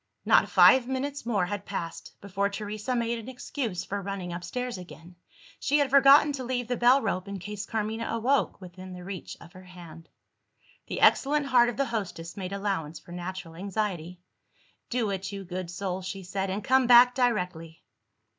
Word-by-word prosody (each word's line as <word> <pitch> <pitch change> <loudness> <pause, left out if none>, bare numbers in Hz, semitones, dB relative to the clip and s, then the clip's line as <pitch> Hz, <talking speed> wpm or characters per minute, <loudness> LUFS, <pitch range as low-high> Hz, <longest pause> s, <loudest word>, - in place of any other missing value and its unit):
Not - - +4
five 260 -2 +6
minutes 270 0 -3
more 205 -6 +1
had 205 +1 -4
passed, 170 -5 -6
before 200 0 -1
Teresa 210 +4 -4
made 235 0 -1
an 230 +3 -9
excuse 245 -6 -4
for 200 0 -4
running 190 -3 -5
upstairs 250 +8 -4
again. 175 0 -12 0.4
She 290 - +2
had 285 -2 +1
forgotten 275 +2 +7
to 270 -2 -4
leave 245 -1 -2
the 245 - -1
bell 250 +3 +4
rope, 190 -2 -2
in 200 0 -5
case 205 +2 -6
Carmina 225 +1 -2
woke, 260 +5 +1
within 185 0 -10
the 180 0 -9
reach 190 -1 -7
of 170 - -15
her 185 0 -13
hand. 170 -2 -13 0.8
The - - -4
excellent 290 +1 +4
heart 245 -3 +4
of 240 - -6
the 275 - +1
hostess 190 -8 -5
made 185 -2 -5
allowance 195 -6 -3
for - - -16
natural 175 -1 -6
anxiety. 180 -2 -3 0.7
"Do 235 -4 0
it, 195 0 -4
you 200 -1 -6
good 180 -1 -5
soul," 185 0 -4
she 190 +1 -6
said; 190 +2 -3
"and 195 +3 -3
come 260 -1 +3
back 245 0 +8
directly!" 180 -10 -1
200 Hz, 180 wpm, -27 LUFS, 180-245 Hz, 0.8 s, back